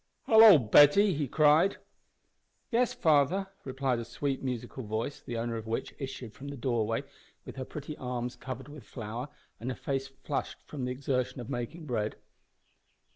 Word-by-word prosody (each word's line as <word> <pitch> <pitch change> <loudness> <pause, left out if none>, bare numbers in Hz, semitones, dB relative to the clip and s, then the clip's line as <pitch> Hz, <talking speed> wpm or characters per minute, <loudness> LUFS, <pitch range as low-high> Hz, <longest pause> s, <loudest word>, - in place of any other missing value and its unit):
"Hallo, 220 -5 +9
Betty!" 145 - +6
he 145 -2 -1
cried. 155 +7 +4 0.9
"Yes, 240 +1 +2
father," 160 +6 +2
replied 130 -2 -1
a - - -3
sweet 135 +3 -3
musical 130 0 -4
voice, 110 +6 -3
the 120 - -5
owner 115 0 -2
of 110 0 -7
which 115 - -3
issued 130 -5 -6
from 140 +1 -10
the 140 0 -6
doorway 115 -3 0 0.4
with - - -9
her 130 - -4
pretty 150 +2 -7
arms 125 -1 -4
covered 130 +1 -7
with 145 -3 -11
flour 115 +5 -6 0.3
and 120 - -4
her 130 - -3
face 135 -1 -2
flushed 135 +1 -4
from 140 -4 -5
the 125 - -2
exertion 130 -1 -2
of 120 - -7
making 150 +8 -5
bread. 110 -6 -2
130 Hz, 165 wpm, -30 LUFS, 120-145 Hz, 0.9 s, Hallo